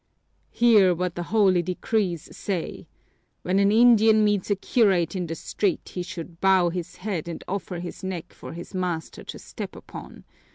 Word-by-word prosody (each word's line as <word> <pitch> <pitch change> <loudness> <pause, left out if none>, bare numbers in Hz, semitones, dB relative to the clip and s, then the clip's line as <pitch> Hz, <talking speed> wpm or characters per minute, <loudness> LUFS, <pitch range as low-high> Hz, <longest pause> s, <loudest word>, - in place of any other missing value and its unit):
"Hear 210 -7 +5
what 180 0 -2
the 175 - -4
holy 195 -5 +4
decrees 180 0 -2
say! 185 -5 -4 0.6
When 185 +2 +1
an 200 0 +4
Indian 220 -1 +6
meets 205 -2 +1
a 205 - +3
curate 195 -4 +2
in 180 -2 -2
the 165 - -4
street 190 +2 -2
he 180 - -3
should 170 -2 -8
bow 190 -2 +4
his 175 -1 -5
head 185 -5 -4
and 170 - -6
offer 190 -1 -4
his 175 +2 -7
neck 185 -3 -5
for - - -9
his 170 +4 -9
master 180 -3 -3
to - - -7
step - - -8
upon. - - -11
185 Hz, 170 wpm, -25 LUFS, 175-205 Hz, 0.6 s, Indian